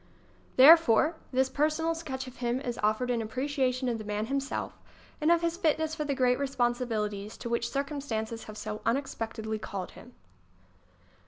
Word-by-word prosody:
Therefore, 305 +1 +7 0.2
this 260 0 +2
personal 310 +4 +1
sketch 270 -5 -5
of 255 0 -11
him 240 0 -1
is 245 -3 -4
offered 215 +4 +1
in 235 -2 0
appreciation 255 +2 -1
of 235 -2 -1
the - - -6
man 210 +1 -2
himself 275 +2 -3 0.4
and 310 +2 +4
of 340 0 +3
his 335 0 0
fitness 315 -2 +1
for 305 -1 -3
the 280 -1 -1
great 250 -1 +2
responsibil 240 -5 0
ities 205 +1 -8
to 235 - -6
ivhich 235 0 0
circumstances 245 -5 -3
have 215 0 -9
so 215 0 -5
unex 270 +4 0
pectedly 220 -1 -4
called 190 -2 -5
him. 245 - -14
255 Hz, 170 wpm, -29 LUFS, 225-285 Hz, 0.4 s, Therefore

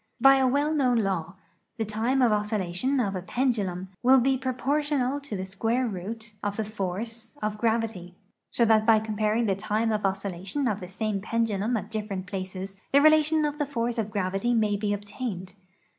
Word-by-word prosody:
By 270 +2 +7
a 265 -1 +3
well 285 +4 +1
known 255 -5 +2
law, 190 -5 -1 0.4
the 225 - -1
time 230 +5 +1
of 235 - +4
oscillation 210 +4 0
of 200 -5 0
a 185 - -3
pendulum 195 -5 -1
will 260 +2 +6
be 265 +2 +2
proportional 270 +1 0
to 280 -8 -5
the 185 - -4
square 225 +6 0
root 215 +3 -6
of 205 0 -3
the 220 - -1
force 215 +2 -5
of 210 0 -2
gravity; 220 -6 -1 0.3
so 235 - +2
that 220 -1 +4
by 225 -1 +7
comparing 215 +1 0
the 200 - +2
time 215 +3 0
of 210 -1 -1
oscillation 195 +6 -2
of 210 -3 -1
the 180 - -7
same 205 +1 -2
pendulum 225 +1 0
at 210 0 -6
different 205 -4 -4
places 190 +1 -6
the 280 - +6
relation 310 +1 +5
of 295 0 -3
the 295 - 0
force 235 -3 -2
of 215 -2 -1
gravity 200 +3 0
may 215 -2 +2
be 205 0 -1
obtained. 205 -2 -5
220 Hz, 185 wpm, -27 LUFS, 195-245 Hz, 0.4 s, By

